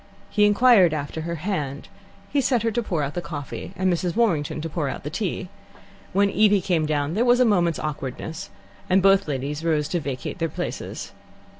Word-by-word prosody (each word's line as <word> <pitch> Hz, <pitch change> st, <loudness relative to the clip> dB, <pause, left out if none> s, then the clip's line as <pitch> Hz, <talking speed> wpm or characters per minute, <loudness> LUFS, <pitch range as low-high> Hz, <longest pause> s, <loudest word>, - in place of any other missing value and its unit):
He 210 Hz, 0 st, +4 dB
inquired 205 Hz, -6 st, +5 dB
after 145 Hz, +2 st, -4 dB
her 170 Hz, +1 st, -3 dB
hand; 150 Hz, -6 st, -3 dB, 0.4 s
he 285 Hz, -, +2 dB
set 245 Hz, -3 st, +1 dB
her 225 Hz, -, +1 dB
to 240 Hz, -, 0 dB
pour 170 Hz, -9 st, -1 dB
out 140 Hz, +1 st, -3 dB
the 175 Hz, -, -3 dB
coffee 150 Hz, -2 st, -6 dB
and 185 Hz, -1 st, +1 dB
Mrs. 175 Hz, +1 st, -2 dB
Warrington 170 Hz, -11 st, +1 dB
to 165 Hz, -, -3 dB
pour 150 Hz, -2 st, -2 dB
out -, -, -6 dB
the 150 Hz, -, -5 dB
tea. 190 Hz, -1 st, -3 dB, 0.6 s
When 200 Hz, +1 st, +3 dB
Evie 210 Hz, -1 st, +4 dB
came 175 Hz, -4 st, 0 dB
down 145 Hz, 0 st, 0 dB
there 220 Hz, +6 st, +2 dB
was 245 Hz, 0 st, +4 dB
a 250 Hz, -, +5 dB
moment's 175 Hz, -7 st, +2 dB
awkwardness, 155 Hz, +1 st, -5 dB, 0.4 s
and 185 Hz, +1 st, +4 dB
both 195 Hz, -1 st, +5 dB
ladies 145 Hz, +2 st, -3 dB
rose 155 Hz, -3 st, +1 dB
to 175 Hz, -, 0 dB
vacate 140 Hz, +3 st, -5 dB
their 165 Hz, -1 st, 0 dB
places. -, -, -5 dB
170 Hz, 195 wpm, -24 LUFS, 150-200 Hz, 0.6 s, inquired